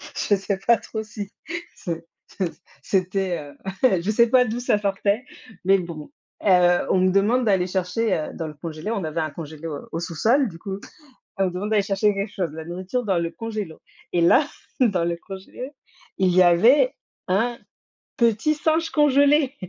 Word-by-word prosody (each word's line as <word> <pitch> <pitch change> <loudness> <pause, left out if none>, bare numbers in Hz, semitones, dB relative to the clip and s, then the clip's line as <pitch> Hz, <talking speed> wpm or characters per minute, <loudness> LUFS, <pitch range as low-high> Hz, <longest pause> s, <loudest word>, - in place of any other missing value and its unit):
je 205 - +2
sais 195 0 -2
pas 235 -1 +5
trop 220 -1 -6
si, 210 -2 -7 0.4
c'est 170 -1 -5 0.2
c'est 185 -4 -3 0.3
c'était, 185 -1 0
heu, 190 - -1
je 190 - -3
sais 235 +2 +4
pas 250 0 +5
d'où 235 +2 -3
ça 215 - +2
sortait, 200 +4 0 0.4
mais 195 +1 +5
bon, 165 -4 -7 0.3
heu, 180 -2 +5
on 185 - +3
me 185 0 +3
demande 215 +6 +3
d'aller 190 -3 +2
chercher, 190 +4 0
heu, 155 - -4
dans 165 - -4
le 155 - -7
congélateur. 160 +7 -5
On 200 - -2
avait 155 +1 -3
un 155 -1 -2
congélateur 155 0 -7
au 165 - -3
sous-sol, 220 - +2
du 170 -5 -10
coup, 195 -2 -5 0.6
on 195 - +2
me - - +1
demande 185 +4 -4
d'aller 215 -2 +4
chercher 205 +1 +2
quelque 200 +1 -3
chose, 180 -5 -2
la 160 0 -7
nourriture 185 +8 -3
dans 190 -4 +1
le 170 0 -2
congélateur. 215 -7 -5 0.3
Et 175 - +2
là, 255 - +5 0.3
dans 200 -9 +3
le 170 0 -1
congélateur, 195 +8 -8 0.5
il 190 -1 +4
y 185 - +7
avait 225 - +5 0.3
un 230 +6 +1 0.6
petit 235 +6 +2
singe 320 +2 +1
congelé. 285 -1 +4
195 Hz, 180 wpm, -23 LUFS, 175-225 Hz, 0.6 s, y